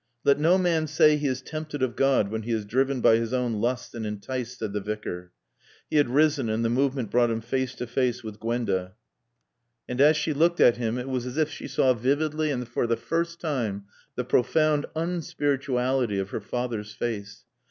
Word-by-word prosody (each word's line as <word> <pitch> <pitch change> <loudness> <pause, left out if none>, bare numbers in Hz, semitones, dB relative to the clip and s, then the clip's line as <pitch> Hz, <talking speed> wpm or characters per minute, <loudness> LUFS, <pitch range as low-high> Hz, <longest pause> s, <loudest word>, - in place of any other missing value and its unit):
"'Let 140 0 +4
no 170 +5 +4
man 170 -4 +1
say 155 0 +5
he 150 -1 -1
is 130 -1 -2
tempted 155 -2 -5
of 125 -2 -1
God 135 -7 +2
when 110 0 -2
he 115 +2 -5
is 110 -2 -1
driven 130 +4 0
by 115 - +6
his 115 +1 -2
own 120 -4 0
lusts 125 +2 -2
and 115 - -5
enticed,'" 120 +4 -4
said 110 -3 -4
the 105 - -2
Vicar. 95 -4 -5 0.6
He - - +2
had 145 -4 +4
risen, 145 -2 +2
and 110 +1 0
the 115 - +1
movement 130 -2 0
brought 120 -1 +3
him 115 -1 -1
face 130 +3 -2
to 125 - -4
face 120 0 -1
with 110 -1 -8
Gwenda. 110 -5 -2 0.9
And 125 +2 -1
as 150 +2 +6
she 155 0 0
looked 170 +4 +2
at 120 - +6
him 120 0 -1
it 125 +1 -4
was 125 -2 -2
as 125 +3 -6
if 155 -1 +1
she - - -7
saw 130 -1 +3
vividly 150 +6 0
and 125 -4 -2
for 120 0 -1
the 115 0 +1
first 170 +1 -2
time 115 - -2 0.3
the 125 - -1
profound 150 +4 +2
unspirituality 135 - 0
of 95 0 -4
her - - -3
father's 110 -2 -4
face. 105 -3 -5
125 Hz, 205 wpm, -26 LUFS, 115-145 Hz, 0.9 s, by